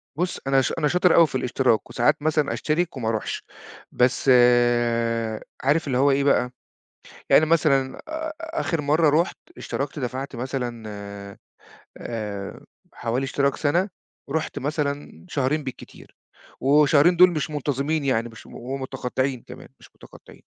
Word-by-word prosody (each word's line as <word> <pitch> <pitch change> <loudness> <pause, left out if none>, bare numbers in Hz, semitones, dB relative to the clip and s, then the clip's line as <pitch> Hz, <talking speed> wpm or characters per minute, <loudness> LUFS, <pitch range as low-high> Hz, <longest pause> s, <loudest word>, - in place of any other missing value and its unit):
بُص، 175 +4 -2
أنا 135 0 +4
ش 130 - -1
أنا 150 -2 +1
شاطر 180 +2 +3
أوي 165 -1 +7
في 135 - -8
الاشتراك 125 -2 +1
وساعات 135 +5 +1
مثلًا 150 -1 +1
أشترك 160 0 -1
وما 115 -3 -2
أروحش. 110 -2 -3 0.5
بس 125 +2 +1 1.3
عارف 145 +4 +2
اللي 130 -3 0
هو 140 +2 +4
إيه 140 +1 +2
بقى، 125 -3 +2 0.8
يعني 155 - +6
مثلًا 150 -5 +2
آآ 315 0 -4
آخر 320 - -2
مرّة 150 +2 +3
رُحت، 175 - -5 0.2
اشتركت 140 +2 -4
دفعت 130 +1 -4
مثلًا 125 -2 -4 1.2
آآ 105 -4 -6 0.3
حوالي 120 +4 -2
اشتراك 140 +1 0
سنة، 170 +6 +1 0.4
ورُحت 160 +2 -2
مثلًا 145 0 -3
شهرين 145 -1 -1
بالكتير، 130 - -10 0.4
وشهرين 150 +4 +4
دول 180 +1 +7
مش 155 -2 -3
منتظمين 145 +1 -1
يعني 120 -4 0
مش 115 -1 -14
ومتقطعين 130 0 -4
كمان، - - -11
مش - - -17
متقطعين. - - -16
140 Hz, 135 wpm, -24 LUFS, 130-155 Hz, 1.3 s, أوي